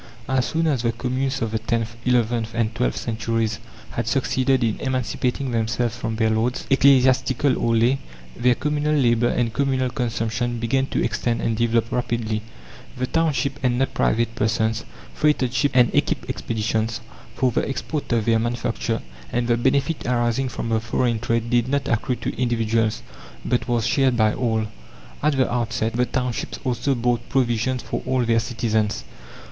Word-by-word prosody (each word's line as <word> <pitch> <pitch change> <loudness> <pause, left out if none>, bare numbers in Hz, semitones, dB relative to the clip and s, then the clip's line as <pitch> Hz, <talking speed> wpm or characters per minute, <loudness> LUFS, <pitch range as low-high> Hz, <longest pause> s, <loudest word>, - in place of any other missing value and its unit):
As 130 -1 +1
soon 165 0 0
as 140 -7 +1
the 115 -1 +1
communes 130 +2 -2
of 110 - -2
the 110 - -1
tenth, 115 0 -2
eleventh, 115 -2 +1
and 115 -1 0
twelfth 125 +2 0
centuries 115 -1 -1 0.3
had 115 -1 -3
succeeded 130 0 +1
in 110 -2 0
emancipating 130 0 -1
themselves 115 +1 0
from 115 -2 -3
their 110 0 +2
lords, 115 +3 0
ecclesiastical 130 0 +4
or 115 -1 +1
lay, 120 +4 +3 0.4
their 125 0 +3
communal 150 +2 0
labour 120 -4 +3
and 120 -2 0
communal 130 0 0
consumption 120 -1 -1
began 130 +4 0
to - - -1
extend 115 +1 -1
and 115 - 0
develop 115 0 +1
rapidly. 115 -3 -1 0.6
The 130 - 0
township 140 -3 0
and 125 -1 +2
not 135 +1 0
private 115 +1 +1
persons 110 0 0 0.3
freighted 145 -5 +1
ships 130 +2 +1
and 125 -2 +5
equipped - - 0
expeditions, 110 0 -1 0.4
for 130 -1 +2
the - - -1
export 145 +2 -3
of 115 -2 +1
their 115 -1 +3
manufacture, 115 0 -2 0.3
and 120 0 0
the 120 - +3
benefit 135 +4 0
arising 120 +1 +1
from 115 - -4
the 110 -1 +2
foreign 115 +1 0
trade 115 0 -1
did 120 0 +3
not 140 0 0
accrue 120 +1 0
to - - -4
individuals, 115 -2 +1 0.4
but 125 +1 0
was 120 -3 +1
shared 130 -3 +2
by 110 -2 +3
all. 110 -3 0 0.6
At 150 -1 +2
the 130 -2 +2
outset, 115 -2 -1
the 125 +1 +1
townships 125 -2 -2
also 130 +2 0
bought 120 -1 -1
provisions 125 0 +1
for - - -3
all 130 -2 +1
their 115 0 +3
citizens. 110 -2 -1
120 Hz, 165 wpm, -23 LUFS, 115-130 Hz, 0.6 s, and